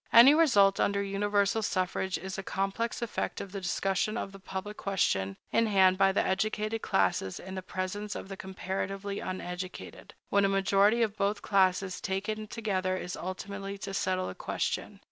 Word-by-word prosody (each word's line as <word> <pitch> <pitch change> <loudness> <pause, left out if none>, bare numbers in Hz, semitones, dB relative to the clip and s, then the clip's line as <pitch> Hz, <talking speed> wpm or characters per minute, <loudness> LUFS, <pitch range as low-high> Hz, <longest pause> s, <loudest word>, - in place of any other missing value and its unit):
Any 245 +5 +9
result 210 -12 +5
under 200 0 +2
universal 200 +1 +1
suffrage 185 -2 -1
is 190 0 -6
a 195 - -3
complex 195 +5 -2
effect 235 - -3
of 195 - -7
the 195 0 -5
discussion 195 +3 0
of 195 - -4
the 195 - -11
public 190 +2 -6
question 100 - 0
in 230 - +3
hand 190 -2 +4
by 195 0 +5
the 195 - +1
educated 215 +3 0
classes 95 - +1
in 190 +1 -8
the 190 - -4
presence 185 +3 -4
of - - -6
the 195 - -6
comparatively 195 +1 -4
uneducated, 185 0 -6
when 200 0 +3
a 195 - +4
majority 195 +4 +3
of 215 -2 -1
both 205 +1 0
classes 190 -1 +2
taken 215 +3 -2
together 190 -4 -1
is 180 -1 -5
ultimately 195 +2 -5
to 195 0 -6
settle 185 -1 0
the - - -5
question. - - -3
195 Hz, 170 wpm, -30 LUFS, 190-205 Hz, -, Any